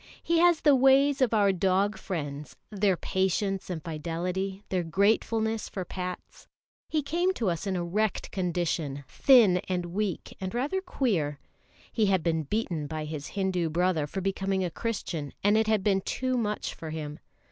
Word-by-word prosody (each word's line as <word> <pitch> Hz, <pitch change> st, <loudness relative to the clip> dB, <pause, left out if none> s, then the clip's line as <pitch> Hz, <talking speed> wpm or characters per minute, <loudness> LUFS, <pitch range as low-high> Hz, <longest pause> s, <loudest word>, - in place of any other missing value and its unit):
He 335 Hz, 0 st, +2 dB
has 345 Hz, -2 st, +5 dB
the 290 Hz, -2 st, +6 dB
ways 270 Hz, +2 st, +4 dB
of 255 Hz, -, +3 dB
our 205 Hz, -3 st, +4 dB
dog 195 Hz, +2 st, +1 dB
friends, 150 Hz, -5 st, -5 dB, 0.2 s
their 200 Hz, -3 st, +2 dB
patience 190 Hz, +1 st, -1 dB
and 165 Hz, -4 st, -4 dB
fidelity, 180 Hz, +5 st, -3 dB
their 185 Hz, -1 st, +1 dB
gratefulness 220 Hz, +5 st, +1 dB
for 185 Hz, -2 st, -5 dB
pats. 180 Hz, 0 st, -7 dB, 0.4 s
He 310 Hz, -2 st, 0 dB
came 350 Hz, +6 st, 0 dB
to 215 Hz, -6 st, 0 dB
us 170 Hz, +4 st, -4 dB
in 190 Hz, -, 0 dB
a 175 Hz, -, -1 dB
wrecked 210 Hz, +4 st, -1 dB
condition, 170 Hz, -6 st, -2 dB
thin 235 Hz, -10 st, +5 dB
and 180 Hz, -1 st, -1 dB
weak 200 Hz, -3 st, -2 dB
and 190 Hz, +4 st, -4 dB
rather 290 Hz, +10 st, 0 dB
queer. 180 Hz, -, -1 dB, 0.5 s
He 220 Hz, -3 st, +2 dB
had 190 Hz, -4 st, +2 dB
been 160 Hz, -2 st, +1 dB
beaten 165 Hz, -3 st, -2 dB
by 155 Hz, 0 st, -4 dB
his 150 Hz, -1 st, -5 dB
Hindu 185 Hz, -4 st, 0 dB
brother 170 Hz, -2 st, +1 dB
for 190 Hz, +6 st, -4 dB
becoming 195 Hz, 0 st, -1 dB
a 175 Hz, -, -3 dB
Christian, 170 Hz, -, -4 dB
and 205 Hz, +1 st, +4 dB
it 220 Hz, 0 st, +3 dB
had 215 Hz, -3 st, +2 dB
been 195 Hz, -2 st, +2 dB
too 255 Hz, +6 st, -1 dB
much 210 Hz, -3 st, -2 dB
for 160 Hz, -, -8 dB
him. 150 Hz, -1 st, -5 dB
190 Hz, 170 wpm, -28 LUFS, 170-220 Hz, 0.5 s, the